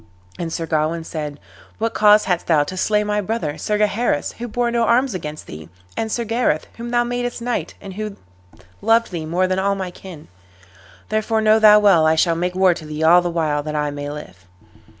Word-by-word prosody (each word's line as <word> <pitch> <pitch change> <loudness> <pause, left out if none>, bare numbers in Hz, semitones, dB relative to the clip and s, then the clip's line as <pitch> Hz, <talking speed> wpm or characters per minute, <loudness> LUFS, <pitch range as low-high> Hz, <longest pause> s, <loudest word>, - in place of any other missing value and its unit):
And 170 -1 -3
Sir 165 - -3
Gawain 160 +1 -1
said, 150 -3 -6 0.4
"What 225 +1 -2
cause 210 0 +5
hadst 180 -2 -1
thou 155 -3 +4
to 185 - -7
slay 210 +2 +1
my 210 0 -1
brother, 190 -7 -3
Sir 210 - -1
Gaheris, 210 -5 0
who 240 - -4
bore 240 +1 -1
no 235 0 0
arms 240 +2 +2
against 155 -4 -6
thee, 75 +1 -10 0.3
and 220 -1 -3
Sir 235 - -1
Gareth, 225 -8 0
whom 235 +1 -6
thou 240 0 +2
madest 245 0 -3
knight, 240 +1 -3
and 195 - -9
who 210 0 -5 0.7
loved 230 -1 +2
thee 165 -3 -5
more 175 +3 +1
than 185 0 0
all 200 +1 +1
my 190 -2 -4
kin? 175 -4 -12 0.8
Therefore 215 +1 0
know 215 0 +4
thou 210 -1 +8
well 190 -7 +5
I 160 - +3
shall 165 +1 +3
make 180 +2 -2
war 185 -1 +4
to 160 - -9
thee 155 +1 -4
all 175 +2 +6
the 175 - -2
while 155 -3 0
that 150 +1 -5
I 150 -1 -1
may 145 0 -5
live." 95 -12 -10
185 Hz, 210 wpm, -20 LUFS, 155-220 Hz, 0.8 s, thou